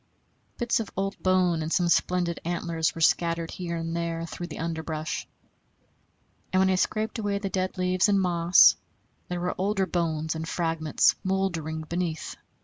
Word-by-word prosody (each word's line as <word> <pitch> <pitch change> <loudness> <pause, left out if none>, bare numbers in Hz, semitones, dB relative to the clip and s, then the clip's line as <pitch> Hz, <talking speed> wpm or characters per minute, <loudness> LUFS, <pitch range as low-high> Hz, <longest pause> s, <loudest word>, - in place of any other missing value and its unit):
Bits 240 0 +1
of 220 - -4
old 195 +1 -1
bone 185 -3 +2
and 155 +1 -3
some 175 0 +2
splendid 175 0 +1
antlers 170 -1 -1
were 165 - -6
scattered 165 0 +2
here 170 -2 -4
and 165 0 -3
there 165 -1 -2
through 175 +1 -6
the 155 - -8
underbrush; 160 -1 -3 1.2
and 185 - +3
when 190 0 +4
I - - +3
scraped 215 +5 -1
away 205 -2 -1
the 200 -1 -3
dead 185 0 -2
leaves 185 +2 +2
and 200 -1 +4
moss, 175 -1 +5 0.5
there 180 0 -3
were 180 - -1
older 195 0 +1
bones 160 -3 -1
and 160 0 -5
fragments 165 -3 +2
mouldering 175 -5 -1
beneath. 165 0 -3
175 Hz, 160 wpm, -27 LUFS, 165-185 Hz, 1.2 s, moss